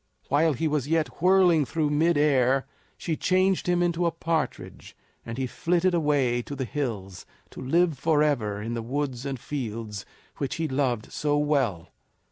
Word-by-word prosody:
While 150 +3 +3
he 160 +5 -1
was 150 -3 -1
yet 160 0 -1
whirling 180 -3 +5
through 150 +1 -1
mid 160 +2 +2
air 135 -2 +3 0.3
she 165 - -2
changed 185 +3 +1
him 175 0 +2
into 175 0 +1
a - - +1
partridge, 165 -1 -4 0.3
and 115 0 -7
he 130 - -1
flitted 175 +7 0
away 145 -7 +1
to 145 - -7
the 130 -1 -3
hills 105 -9 -4 0.2
to - - -9
live 165 +2 +1
forever 145 -9 +1
in 115 +3 -4
the 115 - -3
woods 135 +1 -3
and 135 -2 -4
fields 115 -7 -5 0.3
which 140 - -3
he 165 -1 -1
loved 130 -5 -1
so 145 -1 0
well. 130 - 0
145 Hz, 165 wpm, -26 LUFS, 125-165 Hz, 0.3 s, whirling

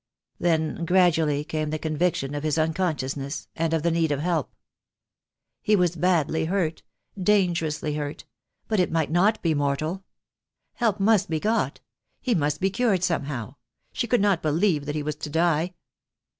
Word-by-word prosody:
Then 160 -1 0
gradually 165 -5 +3
came 155 0 -3
the 155 - -2
conviction 155 -2 -1
of 145 - -3
his 155 0 0
unconsciousness, 155 -4 -1
and 165 0 0
of 165 -2 0
the 170 - +2
need 165 -2 +1
of 145 - 0
help. 165 -2 -1 1.1
He 210 - +3
was 175 -3 +2
badly 165 -2 +1
hurt 170 -2 -1 0.2
— - - -52
dangerously 170 -6 +1
hurt 145 0 -5 0.2
— - - -52
but 215 -3 +1
it 180 - +2
might 160 -2 0
not 200 +6 +3
be 165 -2 +2
mortal. 150 +6 -1 0.7
Help 225 -5 0
must 205 -1 +3
be 160 -1 0
got. 220 +6 0 0.4
He 250 - 0
must 150 -4 0
be 195 +1 +1
cured 200 -4 +1
somehow. 140 - -2 0.4
She 235 - -1
could 240 -2 +2
not 200 -4 +2
believe 155 -1 +1
that 150 - -2
he 150 - -2
was 150 0 -3
to 150 - -6
die. 165 +2 +1
165 Hz, 170 wpm, -25 LUFS, 150-185 Hz, 1.1 s, gradually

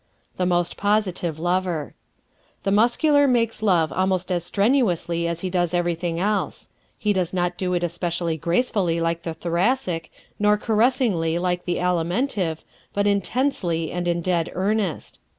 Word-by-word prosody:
The 180 - +1
Most 175 -1 0
Positive 195 -6 0
Lover 175 -2 -1 0.7
¶ - - -41
The 195 - 0
Muscular 285 +7 +4
makes 230 -4 +1
love 175 -7 +2
almost 185 0 0
as 175 -2 0
strenuously 180 - +1
as 170 0 -3
he 185 - -3
does 175 -1 0
everything 175 -1 -1
else. 205 +2 -1 0.3
He 210 -1 +1
does 185 -1 -1
not 175 0 0
do 180 -1 -1
it 175 - -1
especially 170 -1 -1
gracefully 170 - 0
like 165 0 -1
the 165 -1 -5
Thoracic, 175 +1 -1 0.3
nor 210 0 +4
caressingly 220 - +1
like 180 0 -1
the 175 - 0
Alimentive, 180 - -1 0.3
but 200 0 +1
intensely 200 - 0
and 175 0 -2
in 170 0 0
dead 170 -2 0
earnest. 195 -1 -1
180 Hz, 150 wpm, -23 LUFS, 170-205 Hz, 0.7 s, Muscular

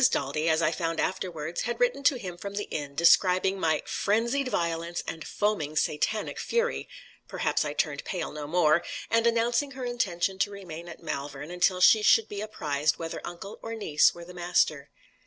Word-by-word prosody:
Daldy, 155 +4 0
as 160 +1 +2
I 155 - +3
found 165 -1 -2
afterwards, 170 -3 -2
had 240 +1 -3
written - - +2
to 280 - +5
him 185 -8 -6
from 200 +3 -7
the 205 - -3
inn, 145 -2 -4
describing 185 +3 +4
my 160 -3 +1
"frenzied 235 +6 0
violence, 170 -4 -2
and 160 -1 -5
foaming 200 -8 -1
Satanic 155 +9 -1
fury" 475 +1 -1 0.4
perhaps - - 0
I - - -3
turned - - -1
pale, 180 -4 -4
no 150 -1 -6
more 165 0 +3 0.3
and 230 0 +3
announcing 235 +4 +1
her 260 -1 -5
intention 195 -6 -1
to 205 - +2
remain 175 -4 -8
at 170 - -11
Malvern, 145 0 -5
until 180 +1 +1
she 215 +3 +7
should 220 +1 +5
be 205 -1 -5
apprised 150 -8 -1
whether 165 -1 -5
uncle 190 +4 -8
or 225 0 -5
niece 155 -9 +3
were 170 0 -9
the 180 - -11
master. 175 -5 0
180 Hz, 180 wpm, -28 LUFS, 160-215 Hz, 0.4 s, she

